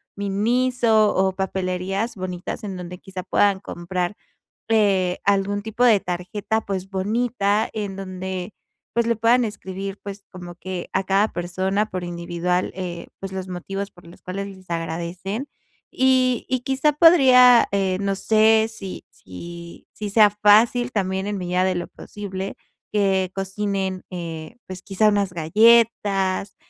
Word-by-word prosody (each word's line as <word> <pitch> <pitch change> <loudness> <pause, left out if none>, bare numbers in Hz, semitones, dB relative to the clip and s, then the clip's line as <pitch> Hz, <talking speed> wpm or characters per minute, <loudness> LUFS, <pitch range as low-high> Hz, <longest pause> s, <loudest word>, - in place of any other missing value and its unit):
Miniso, 220 +2 +2
o 190 0 +2
papelerías 190 +3 -2
bonitas 185 +2 -5
en 195 -3 -5
donde, 180 0 -8
quizá, 190 -2 -7
puedan 200 +1 +2
comprar, 180 +1 -3 0.6
eh, 195 -5 +2
algún 200 0 +1
tipo 220 +3 -1
de 230 -4 +6
tarjeta, 185 +5 -2
pues, 190 -2 -4
bonita, 210 +1 0
en 205 -3 -4
donde. 185 0 -5 0.4
pues, 235 0 +2
le 235 - +2
puedan 235 +3 +3
escribir, 195 -2 -6
pues, 200 0 -8
como 180 -2 -9
que 185 -1 -6
a 190 - 0
cada 195 +3 +2
persona 190 +4 -1
por 185 -2 -4
individual, 175 +1 -2
eh, 175 -2 -6
pues, 195 -1 -6
los 190 -1 -5
motivos 195 +2 -5
por 175 -1 -18
los 170 - -15
cuales 195 +2 -4
les 190 -2 -14
agradecen. 175 - -4 0.4
Y 255 -2 +2
y 255 -1 0
quizá 270 +4 +1
podría, 260 -6 +7
eh, 190 -2 +1
no 200 -1 0
sé, 220 +2 +4
si 200 -4 -8
si 170 - -11
si 210 - -5
sea 210 0 +6
fácil 220 +4 +4
también 190 -1 -1
en 205 0 -2
medida 180 0 0
de 185 0 +1
lo 175 - -4
posible 195 -2 -7 0.4
que 190 -3 +1
cocinen, 195 -1 -3
eh, 165 -2 -7
pues, 185 0 -8
quizá, 205 +2 +2
unas 200 -3 +1
galletas, 200 +1 +3
195 Hz, 145 wpm, -22 LUFS, 185-215 Hz, 0.6 s, podría